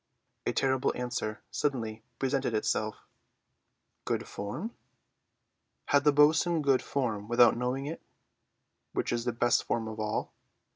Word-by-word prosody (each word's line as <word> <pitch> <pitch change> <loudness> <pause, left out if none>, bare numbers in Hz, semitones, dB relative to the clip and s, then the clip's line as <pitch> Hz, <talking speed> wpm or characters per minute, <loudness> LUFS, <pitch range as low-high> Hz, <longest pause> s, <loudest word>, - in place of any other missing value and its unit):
A - - +3
terrible 130 -1 +1
answer 120 -3 -3
suddenly 115 -6 -2 0.2
presented 135 -2 0
itself—"Good 110 0 -5
form?" 130 - -5 1.1
Had 145 0 +4
the 150 - +7
bo'sun 155 +3 +4
good 135 -2 +4
form 110 -7 -2
without 120 0 +6
knowing 125 +3 -1
it, 160 +3 -5 0.9
which - - -1
is 120 0 -1
the 120 - +1
best 120 +1 +2
form 115 -1 -1
of 110 0 -6
all? 110 0 -2
125 Hz, 125 wpm, -30 LUFS, 110-140 Hz, 1.1 s, the